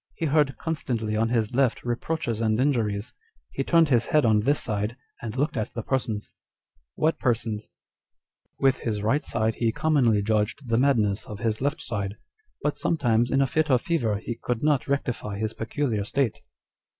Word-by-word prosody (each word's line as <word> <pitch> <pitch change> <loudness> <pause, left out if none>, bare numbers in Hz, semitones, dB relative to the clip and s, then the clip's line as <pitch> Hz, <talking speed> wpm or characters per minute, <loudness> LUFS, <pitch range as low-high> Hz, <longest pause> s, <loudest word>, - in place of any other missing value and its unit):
He 165 - -2
heard 145 -3 +2
constantly 120 -9 -2
on 115 +1 +1
his 115 -1 0
left 130 -1 +2
reproaches 120 -1 -2
and 110 0 +1
injuries; 115 -7 0 0.4
he 135 - -2
turned 165 +1 +4
his 120 -4 +3
head 150 -4 +3
on 110 -2 +4
this 140 +7 +2
side, 105 +3 -2 0.2
and 115 +1 -5
looked 150 +2 0
at 110 -3 -3
the 115 - -3
persons." 115 -5 -2
â€" - - -37 0.6
[What 160 +1 +1
persons?] 115 -4 0
â€" - - -32 0.5
" - - -20
With 135 -1 +4
his 105 -3 -2
right 135 +8 +2
side 110 0 0
he 115 -1 +3
commonly 120 -7 +2
judged 110 +5 0
the 115 0 +2
madness 110 -7 +2
of 105 - -6
his 110 -1 -1
left 145 +1 -1
side; 105 -5 -3 0.5
hut 150 - 0
sometimes 120 -7 +2
in 135 +2 +2
a - - +3
fit 155 +3 0
of 125 -3 +3
fever 120 -12 0
he 110 +3 -4
could 125 0 -2
not 150 -3 +2
rectify 125 -7 -2
his 110 +1 -2
peculiar 115 -2 -1
state. 125 +3 -1
120 Hz, 185 wpm, -26 LUFS, 110-140 Hz, 0.6 s, turned